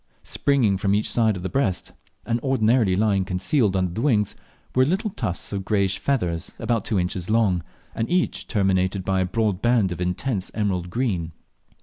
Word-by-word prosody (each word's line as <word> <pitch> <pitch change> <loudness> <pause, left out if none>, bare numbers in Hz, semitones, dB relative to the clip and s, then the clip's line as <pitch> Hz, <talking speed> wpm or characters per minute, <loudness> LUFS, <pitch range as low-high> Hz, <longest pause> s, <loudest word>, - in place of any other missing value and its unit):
Springing 125 -9 +1
from 100 +1 +2
each 105 - 0
side 110 -4 +2
of 90 - -8
the - - -1
breast, 110 -10 -1 0.3
and 115 0 0
ordinarily 115 -6 +2
lying 100 -1 +2
concealed 95 +4 +1
under 90 -2 0
the 110 - -3
wings, 110 -7 +1 0.4
were 130 - +4
little 195 - 0
tufts 105 - -3
of 100 -1 -2
greyish 100 -2 +1
feathers 90 - -1
about 115 -4 -1
two 105 - 0
inches 90 +1 -3
long, 105 -6 +2 0.3
and 115 - -2
each 180 0 0
terminated 95 -2 +1
by 95 -1 +1
a - - +1
broad 100 0 -1
band 120 -6 +2
of 90 0 -5
intense 95 +3 -1
emerald 95 -5 -1
green. 90 -8 -2
100 Hz, 180 wpm, -23 LUFS, 95-115 Hz, 0.4 s, were